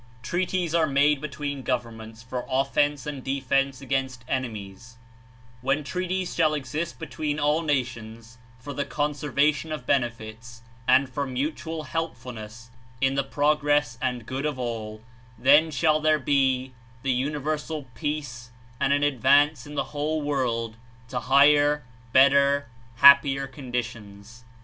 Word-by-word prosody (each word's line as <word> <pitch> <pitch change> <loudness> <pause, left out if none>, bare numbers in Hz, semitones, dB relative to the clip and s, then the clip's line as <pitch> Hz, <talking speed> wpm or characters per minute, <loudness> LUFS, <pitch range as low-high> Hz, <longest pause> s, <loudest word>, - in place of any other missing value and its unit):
Treaties 180 -2 -1
are 165 -2 +3
made 140 0 +3
between 145 -1 -4
governments 115 -3 -4
for 125 0 -6
of 135 +1 0
fence 145 -2 +1
and 145 -3 -5
defence 135 0 0
against 130 -2 -2
enemies; 115 -4 -5 0.6
when 135 +4 0
treaties 185 +4 -3
shall 155 -2 +2
exist 150 +4 -4
between 150 -2 -3
all 150 +2 +2
nations 115 -6 -3 0.2
for 140 +3 -8
the 140 - -1
conservation 150 +1 0
of 150 -5 -5
benefits 115 -3 -3 0.2
and 135 0 +5
for 140 +2 -3
mutual 155 +4 -3
helpfulness 120 -9 -6 0.3
in 135 0 +2
the 140 0 0
progress 145 -4 +1
and 125 -3 -2
good 135 +4 -3
of 150 -3 -3
all, 110 -3 -5 0.3
then 145 +6 +5
shall 155 +1 +2
there 155 0 +3
be 130 -2 +1 0.3
the 135 - +1
universal 150 +3 -2
peace 145 -6 -4 0.3
44 - - -1
and - - +3
an 145 0 +1
advance 145 +2 +3
of 145 - -9
the - - 0
whole 150 +1 -1
world 115 -6 -1 0.3
to - - -2
higher, 145 +2 +4 0.3
better, 140 +2 +5 0.3
happier 140 +1 +6
conditions. 115 -4 -7
140 Hz, 135 wpm, -25 LUFS, 125-150 Hz, 0.6 s, happier